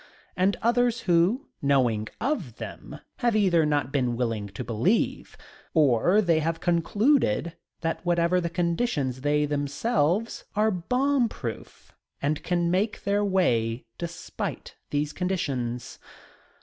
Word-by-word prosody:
And 190 +2 +2
others 240 0 +2
who, 180 - +2 0.2
knowing 125 -6 +2
of 225 - -2
them, - - -8 0.2
have 240 -3 +1
either 175 -7 +3
not 145 -3 0
been 125 -4 0
willing 115 -4 -1
to 100 +5 -7
believe 120 - 0 0.4
or 155 - +4
they 165 -3 +3
have 165 +1 -1
concluded 175 - +2 0.3
that 165 0 -2
whatever 175 +1 +2
the 170 - -2
conditions 170 - -1
they 150 +1 +2
themselves 150 - 0
are 215 +1 +3
bomb 250 +7 +1
proof 115 - -8 0.3
and 150 +1 -1
can 175 -1 0
make 205 +4 0
their 200 +1 +1
way 125 - +1
despite 170 -1 -5 0.2
these 145 0 -1
conditions. 135 -11 -3
170 Hz, 125 wpm, -26 LUFS, 140-200 Hz, 0.4 s, or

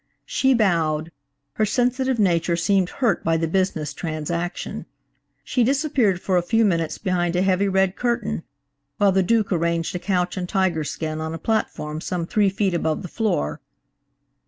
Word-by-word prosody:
She 270 - +2
bowed; 165 -7 +1 0.5
her 215 - +2
sensitive 250 +2 +1
nature 170 -4 +2
seemed 185 +1 +2
hurt 235 -9 0
by 165 0 +2
the 165 0 0
business 160 -4 -1
transaction. 170 +3 -4 0.6
She 250 - +1
disappeared 265 - +2
for 185 -1 +1
a - - +3
few 225 +5 +2
minutes 165 -5 0
behind 175 -3 0
a 180 - +2
heavy, 195 +1 +2
red 190 -1 +2
curtain, 235 -5 -1 0.6
while 200 -1 +4
the 190 0 +3
Duke 215 +2 +1
arranged 170 -1 0
a - - -1
couch 180 -1 -1
and 180 -1 -3
tiger 185 -6 +1
skin 155 +1 -4
on 160 +1 -3
a - - -4
platform 155 -5 -2
some 175 -1 -2
three 205 +3 +2
feet 195 -1 0
above 160 -2 -1
the 180 - -6
floor. 115 - -1
185 Hz, 165 wpm, -23 LUFS, 165-215 Hz, 0.6 s, while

